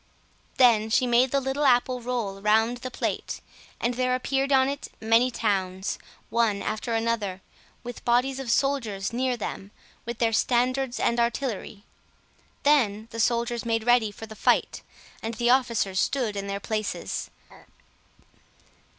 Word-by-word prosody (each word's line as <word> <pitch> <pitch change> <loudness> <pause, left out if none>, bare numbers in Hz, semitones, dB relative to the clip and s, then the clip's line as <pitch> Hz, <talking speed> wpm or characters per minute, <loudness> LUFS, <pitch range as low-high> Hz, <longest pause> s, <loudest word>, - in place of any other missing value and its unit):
Then 225 -4 +5
she 250 - +3
made 245 +2 +4
the 275 - +2
little 270 +2 -2
apple 250 -1 +3
roll 230 -5 -3
round 220 +3 +3
the 255 +1 -6
plate, - - -3 0.4
and 240 +1 0
there 255 +1 +1
appeared 270 +2 -1
on 265 -1 +5
it 280 +1 -4
many 225 +3 +3
towns, 190 -5 -1 0.3
one 220 -3 +1
after 225 +1 -1
the 225 - -2
other, 200 -5 -2 0.4
with 245 -1 -8
bodies 250 +3 +2
of 265 -3 -5
soldiers 230 -7 0
near 250 0 0
them, 200 -2 -5 0.3
with 235 0 -5
their 230 -1 +1
standards 250 +2 +1
and 235 - +1
artillery. 235 -4 -2 0.8
Then 230 -7 +2
the 230 - -6
soldiers 235 0 +1
made 225 -1 0
ready 240 -3 +3
for 225 - -9
the 220 0 -11
fight, - - +1 0.4
and 225 +1 -4
the 240 +2 +2
officers 235 -7 +1
stood 240 -7 0
in 200 0 -4
their 200 0 -3
places. 215 0 -3
235 Hz, 150 wpm, -26 LUFS, 220-255 Hz, 0.8 s, Then